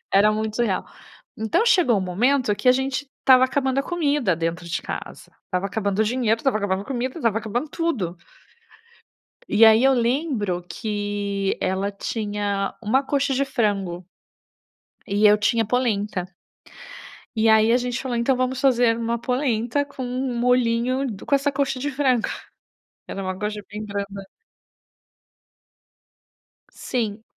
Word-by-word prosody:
Era 200 +2 +5
muito 215 0 -3
surreal. 230 -6 0 0.5
Então, 220 - +1
chegou 360 - +4
um - - -1
momento 215 +5 +1
que 255 - +1
a - - +8
gente 265 +1 -2
estava 260 -1 +6
acabando 265 0 0
a - - +2
comida 290 - 0
dentro 165 +1 -3
de 170 - -3
casa. - - -7
Estava 185 +1 -2
acabando 200 0 -1
o 220 - +4
dinheiro, 230 -1 +1
estava 265 -6 +1
acabando 195 -2 -1
a - - -13
comida, 255 +1 -3
estava 225 -6 +1
acabando 230 +7 -3
tudo. 235 - -2 1.3
E 225 +2 +5
aí, 220 +2 +6
eu 270 0 +5
lembro 235 - 0
que 205 0 -2
ela 190 +2 -1
tinha 205 -1 -3
uma 245 +6 +2
coxa 280 0 0
de 275 +2 +1
frango 195 -9 -1 1.0
e 205 +2 +3
eu 210 - +6
tinha 225 +2 +1
polenta. 210 -6 -1 1.1
E 220 0 +2
aí, 220 0 +5
a 240 - +5
gente 250 0 -3
falou: 255 -3 -2
"Então 235 +3 +2
vamos 255 0 -1
fazer 245 -4 +3
uma 230 0 -2
polenta 250 +1 0
com 280 -2 -8
um 250 0 -3
molhinho 250 +1 +2
do 200 -3 -8
com 280 - +3
essa 280 +1 +1
coxa 270 -2 -1
de 290 +3 -2
frango". 260 -4 +1 0.8
Era 195 - -5
uma 185 0 -4
coxa 210 0 -3
bem 210 +1 -6
branda. 200 -1 -5 2.5
Sim. 220 -3 -3
230 Hz, 150 wpm, -23 LUFS, 205-260 Hz, 2.5 s, a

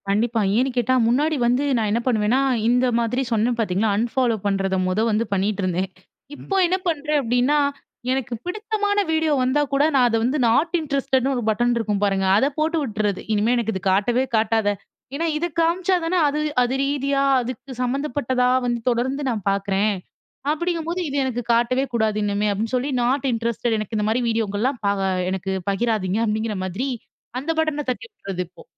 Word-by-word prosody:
கண்டிப்பா. 225 +3 +1 0.2
ஏன்னு 260 +3 +2
கேட்டா, 245 +1 +2
முன்னாடி 295 +7 +2
வந்து 250 +3 +2
நான் 220 -2 0
என்ன 230 +3 +1
பண்ணுவேன்னா, 230 +2 +2 0.3
இந்த 250 +1 +3
மாதிரி 235 +3 0
சொன்னேன் 230 +2 +1
பாத்தீங்களா, 210 0 +1
அன்ஃபாலோ 235 +1 +1
பண்றத 195 -1 0
மொத 185 +3 0
வந்து 215 +2 +1
பண்ணிட்டுருந்தேன். 190 -2 -1 0.5
இப்போ 390 - -5
என்ன 370 +2 +1
பண்றேன்? 300 -2 0
அப்டின்னா, 245 +5 +2 0.5
எனக்கு 265 -1 -2
பிடித்தமான 415 +1 -1
வீடியோ 320 -1 +2
வந்தா 260 +4 +2
கூட, 275 +1 +3
நான் 250 -2 +5
அத 230 - 0
வந்து 255 +5 +1
நாட் 310 +10 +2
இன்ட்ரஸ்டட்ன்னு 275 -2 0
ஒரு 245 - -1
பட்டன் 240 +3 +2
இருக்கும் 210 -3 -1
பாருங்க 195 -1 +1
அத 225 - +3
போட்டு 320 +2 +1
உட்டுறது. 210 -4 -2
"இனிமே 215 +3 +2
எனக்கு 230 -2 -1
இது 190 - -4
காட்டவே 235 +7 +2
காட்டாத" 220 -1 +2 0.5
ஏன்னா 330 +4 -1
இது 340 +3 -1
காமிச்சா 350 +3 +2
தானே 355 +3 +1
அது 290 +1 -1 0.2
அது 245 +1 +1
ரீதியா, 275 0 0 0.2
அதுக்கு 255 +2 -7
சம்மந்தப்பட்டதா 255 -1 0 0.2
வந்து 240 -1 0
தொடர்ந்து 255 +4 -1
நான் 225 -4 -2
பாக்குறேன். 200 +1 +1 0.6
அப்டிங்கும்போது, 340 +2 -2
"இது 285 0 -3
எனக்கு 250 -2 -2
காட்டவே 240 +3 +2
கூடாது 220 -2 +1
இனிமே" 205 +1 0
அப்டின்னு 215 +3 -3
சொல்லி 255 +3 -1
"நாட் 255 +3 +1
இன்ட்ரஸ்டட் 230 0 -1
எனக்கு 215 +1 -4
இந்த 210 - 0
மாரி 235 +3 +1
வீடியோக்கலாம் 225 +3 -1
பா 200 - +3 0.4
எனக்கு 190 0 -3 0.2
பகிராதீங்க" 210 -2 0
அப்டிங்கிற 215 0 -1
மாதிரி 190 +9 -3 0.5
அந்த 290 +5 -2
பட்டன 305 -2 0
தட்டி 255 - -3
விடுறது 195 - -5
இப்போ. 175 - -16
240 Hz, 165 wpm, -22 LUFS, 215-275 Hz, 0.6 s, நான்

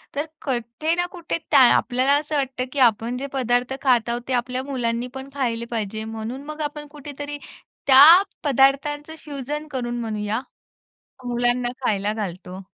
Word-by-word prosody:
तर 290 +2 -1 0.2
कुठे 255 +5 -1
ना 350 0 0
कुठे 345 -2 -4
त्या 285 - +7 0.2
आपल्याला 255 +2 +2
असं 300 0 -5
वाटतं 265 -3 -1
की 285 - -2
आपण 230 +3 -2
जे 275 +2 -4
पदार्थ 245 -1 0
खात 245 -4 +2
आहोत 240 +1 -1
ते 260 - -1
आपल्या 250 +1 -1
मुलांनीपण 250 0 -3
खाल्ले 235 -4 -2
पाहिजे 220 -1 -3
म्हणून 230 +5 -5
मग 305 +1 -7
आपण 295 0 -4
कुठेतरी 290 0 -7 0.5
त्या 270 +1 +9 0.4
पदार्थांचं 290 +2 +2
फ्युजन 295 +1 -5
करून 240 -2 -3
म्हणूया 215 0 -2 0.8
मुलांना 245 0 0 0.2
खायला 205 -2 +1
घालतो. 185 -2 -6
255 Hz, 145 wpm, -23 LUFS, 235-285 Hz, 0.8 s, त्या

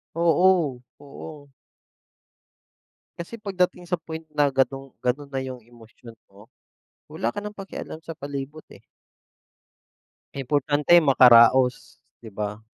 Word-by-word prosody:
Oo, 170 -5 +2 0.2
oo. 145 0 -12 1.7
Kasi 170 +7 -8
pagdating 180 -3 -2
sa 180 - 0
point 160 0 -8
na 145 -1 +1
gano'ng 135 0 -1
gano'n 140 +3 -2
na 135 - -2
yung 130 -2 -8
emosyon 115 0 -16 0.2
mo, 100 +3 -17 0.6
wala 115 - -3
ka - - -5
nang 210 0 -8
pakialam 195 -4 -8
sa 165 -2 -8
palibot, 140 +1 -7
eh. - - -16 1.5
Importante 145 +4 +1
makaraos, 125 -2 +5 0.2
'di 110 - -10
ba? 105 +1 -5
140 Hz, 115 wpm, -24 LUFS, 125-165 Hz, 1.7 s, makaraos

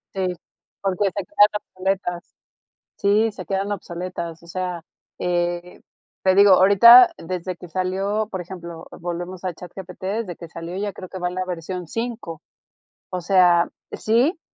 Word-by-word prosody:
Sí, 190 -1 0 0.5
porque 195 0 0
se 195 0 -1
quedan 205 +3 +5
obsoletas. 185 -2 -3 0.6
Sí, 210 +2 +2
se 190 -3 -8
quedan 195 +2 -2
obsoletas, 170 -3 -6
o - - -15
sea, 180 0 -4 0.4
eh, 175 0 -2 0.4
te 190 - +5
digo, 200 0 +7
ahorita 205 +7 +9
desde 180 +1 -4
que 180 - -11
salió 195 +4 -1
por 190 - -4
ejemplo, 170 -2 -8
volvemos 175 +1 -5
a 185 - -1
ChatGPT, 180 +1 -10
desde 195 -2 -3
que 170 - -10
salió 165 +2 -7
yo 205 +1 -2
creo 185 - -9
que 190 - -7
va 180 -1 -1
la 185 +1 -3
versión 180 0 -5
5. 225 -7 -5 0.7
O 180 -1 -3
sea 175 -1 +4 0.2
sí, 250 - +1
185 Hz, 150 wpm, -22 LUFS, 175-200 Hz, 0.7 s, ahorita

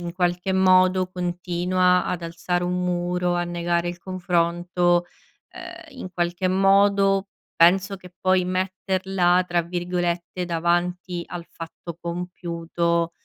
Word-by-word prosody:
in 170 -1 -5
qualche 180 +1 0
modo 185 0 +4
continua 180 0 +1
ad 180 -1 -3
alzare 175 +1 -2
un 180 0 -1
muro, 180 0 0
a 175 0 0
negare 175 0 -1
il 175 0 -5
confronto, 175 -1 0 0.5
ehm, - - -10
in 185 - -6
qualche 175 +2 0
modo 195 +1 +3 0.3
penso 190 +4 +4
che 180 -1 -15
poi 185 -1 +3
metterla 185 -1 +1
tra 175 -1 +1
virgolette 175 0 -2
"davanti 175 +1 -1
al 175 -1 -7
fatto 165 0 -9
compiuto", 170 -1 -2
180 Hz, 120 wpm, -23 LUFS, 175-185 Hz, 0.5 s, modo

